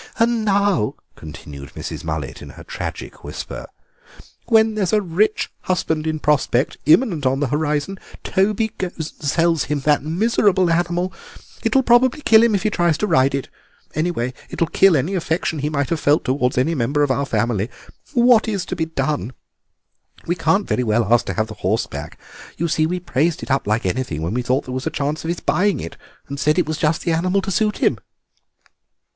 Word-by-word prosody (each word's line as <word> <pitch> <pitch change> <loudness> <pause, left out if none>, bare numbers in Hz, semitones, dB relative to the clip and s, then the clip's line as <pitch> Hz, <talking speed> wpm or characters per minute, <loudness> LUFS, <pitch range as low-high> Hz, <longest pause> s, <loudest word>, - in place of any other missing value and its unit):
"And 230 -1 +2
now," 200 - +1 0.2
continued 70 -2 -10
Mrs. - - -6
Mullet, 80 -4 -4
in - - -9
her - - -10
tragic - - -7
whisper, - - -7 0.8
"when 220 -1 +4
there's 200 -3 -1
a 215 - +5
rich 200 +3 0
husband 160 -4 -1
in 155 0 -1
prospect 145 -3 +1
imminent 160 - +4
on 135 +1 +1
the 145 -3 0
horizon 150 +6 -1 0.2
Toby 210 +3 +1
goes 185 -2 -2
and 160 - -3 0.2
sells 165 0 +2
him 150 -1 -2
that 150 +1 +3
miserable 185 +2 +2
animal. 175 +2 0 0.5
It 225 +1 0
will 265 - +5
probably 245 +4 +4
kill 220 -1 +6
him 230 -2 +3
if 195 - -1
he 215 - +1
tries 170 -5 +2
to 210 - 0
ride 135 -7 +3
it; 135 - -3 0.5
anyway 155 -6 -1 0.2
it - - -7
will 165 - +1
kill 185 -1 +5
any 155 +9 -1
affection 165 -3 -1
he 145 +2 -1
might 145 -1 -1
have 165 - 0
felt 145 +2 +2
towards 125 -1 0
any 130 +7 +2
member 145 +1 +1
of 145 - +1
our 140 +2 0
family. 110 -1 0 0.5
What 240 -2 +5
is 200 -4 -2
to 185 - -4
be 165 -2 -1
done? 150 -5 -2 0.9
We 170 - 0
can't 175 +4 +1
very 125 - 0
well 110 0 +2
ask 120 0 +3
to - - -1
have 110 - +1
the 110 - -9
horse 105 +5 +1
back; - - -8 0.4
you 170 - 0
see, 155 0 +1
we 180 +2 -2
praised 165 -1 0
it - - -5
up 135 -5 +1
like 110 +1 0
anything 90 -6 -2
when 85 - -2
we 125 - 0
thought 130 +3 0
there 130 - -6
was 130 0 -3
a - - +2
chance 145 +2 -2
of - - -5
his 170 - -2
buying 200 +2 +1
it, 85 - -7 0.3
and 140 0 -6
said 150 +3 +2
it 180 - +3
was 155 0 -3
just 160 +1 +1
the 170 - 0
animal 180 +4 +1
to 195 - -3
suit 210 +3 +1
him." - - +1
160 Hz, 205 wpm, -20 LUFS, 135-190 Hz, 0.9 s, kill